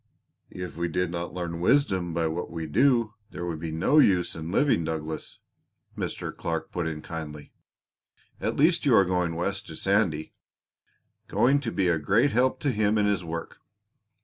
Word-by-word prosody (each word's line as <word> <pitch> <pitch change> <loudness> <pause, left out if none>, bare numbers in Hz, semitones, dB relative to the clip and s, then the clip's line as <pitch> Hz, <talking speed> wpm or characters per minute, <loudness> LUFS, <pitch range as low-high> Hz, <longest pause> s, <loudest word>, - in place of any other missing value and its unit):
"If 90 -4 -7
we 85 0 0
did 90 +1 -1
not 85 0 -4
learn 85 -2 -4
wisdom 95 - +2
by 85 0 0
what 80 +2 -2
we 85 -1 -5
do 115 - +3 0.2
there 85 - -6
would 85 -3 -4
be 80 0 -4
no 85 - +3
use 90 -10 +3
in 80 +1 -6
living, 130 - +3
Douglas," 80 0 -5 0.6
Mr. - - -4
Clark 80 -1 -3
put 85 -2 -2
in 75 -1 -5
kindly. 75 -3 -7 0.9
"At - - -1
least 165 +4 +3
you 135 -6 +4
are 100 - +6
going 90 -2 0
West 100 +3 -2
to 80 - -8
Sandy 95 -5 0 0.9
going 135 +4 +3
to 125 -5 -4
be 95 -3 +1
a 85 -2 +2
great 110 - +3
help 130 +2 +2
to 145 - +1
him 105 -1 +1
in 105 - +3
his 100 -3 +1
work." 85 0 -6
90 Hz, 175 wpm, -27 LUFS, 80-105 Hz, 0.9 s, are